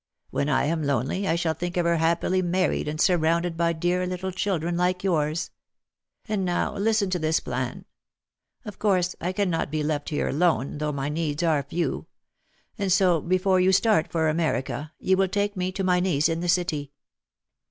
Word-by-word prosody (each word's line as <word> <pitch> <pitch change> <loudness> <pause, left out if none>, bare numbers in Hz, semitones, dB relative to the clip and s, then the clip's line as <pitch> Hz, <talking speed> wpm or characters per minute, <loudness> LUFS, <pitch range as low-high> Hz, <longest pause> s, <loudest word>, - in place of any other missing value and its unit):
When 140 - -1
I 140 - +2
am 160 +2 0
lonely, 140 - -1
I 165 - +2
shall 170 -1 0
think 175 +3 -4
of 175 - +1
her 170 0 +2
happily 170 +3 +1
married 185 -1 0
and 155 +1 -3
surrounded 170 -1 +2
by 170 0 +1
dear 175 +2 0
little 185 +1 -3
children 180 -3 -1
like 180 +1 0
yours. 155 -4 0 0.8
And 210 -3 -1
now 180 +2 -1
listen 205 -1 +1
to 180 - 0
this 160 0 +1
plan. - - -4 0.8
Of 210 - -8
course 185 -4 +1
I 180 - -1
can 190 -1 0
not 165 - -1
be 155 +1 -2
left 150 -1 -2
here 150 - -1
alone, 150 -2 +1
though 150 0 -1
my 140 0 -3
needs 155 0 -2
are 155 -4 +2
few. 140 - -3 0.7
And 200 -2 0
so 180 -4 +4
before 185 +2 +2
you 185 +1 +4
start 195 -3 +3
for 160 -2 +1
America 155 -2 -1
you 190 0 +1
will 195 0 +3
take 205 +2 -1
me 185 0 -2
to 195 - -3
my 180 -1 +3
niece 165 -5 +2
in 165 0 -1
the 175 +1 -2
city. 160 -5 0
175 Hz, 190 wpm, -25 LUFS, 155-185 Hz, 0.8 s, so